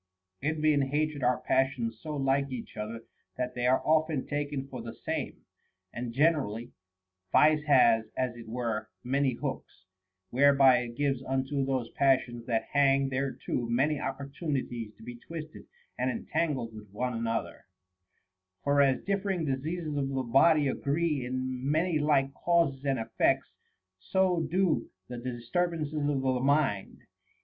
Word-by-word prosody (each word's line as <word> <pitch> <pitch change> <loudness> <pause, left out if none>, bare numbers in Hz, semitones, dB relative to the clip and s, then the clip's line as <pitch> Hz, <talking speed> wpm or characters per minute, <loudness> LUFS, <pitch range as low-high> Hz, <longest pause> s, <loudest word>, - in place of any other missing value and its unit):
1. 150 +3 0
Envy 155 -1 +2
and 140 -2 +2
hatred 150 +1 -1
are 125 0 +2
passions 125 -4 0
so 155 -1 -5
like 135 0 +1
each 125 -3 -7
other 110 +2 -5 0.3
that 125 0 -2
they 125 0 0
are 130 +1 +3
often 155 -3 +2
taken 145 -2 -3
for 130 -3 -7
the 115 0 -8
same. - - -4 0.5
And 120 0 -4
generally, 125 -5 +1 0.6
vice 155 0 +5
has 120 -6 +5
(as 125 -2 -1
it 115 -1 -11
were) 110 -2 -3
many 135 +1 +1
hooks, 95 -4 -6 0.5
whereby 135 -1 +6
it 120 -1 -6
gives 140 -3 0
unto 135 +1 -1
those 130 -3 -2
pas 135 -1 +4
sions 120 -2 -9
that 115 -2 -1
hang 140 -1 +3
thereto 130 -2 -2
many 140 +5 +2
opportunities 135 -5 -4
to - - -16
be 120 +1 -8
twisted 155 +4 -9 0.3
and - - +1
entangled 150 - -2
with 105 -1 -11
one 125 +4 -2
another; 115 0 -3 1.0
for 140 0 +3
as 135 -2 +2
differing 195 -4 -1
diseases 155 +3 -2
of 140 -1 -1
the 135 -1 -1
body 145 +5 +4
agree 145 +1 0
in 130 +1 -3
many 160 +1 +1
like 140 -2 +2
causes 165 -6 +1
and 135 -1 +1
effects, 110 0 0 0.5
so 185 - +1
do 175 -9 +1 0.2
the 125 -1 -5
disturbances 150 +6 -2
of 150 -2 -1 0.2
the 130 -1 +1
mind. 135 -7 0
135 Hz, 150 wpm, -29 LUFS, 125-150 Hz, 1.0 s, whereby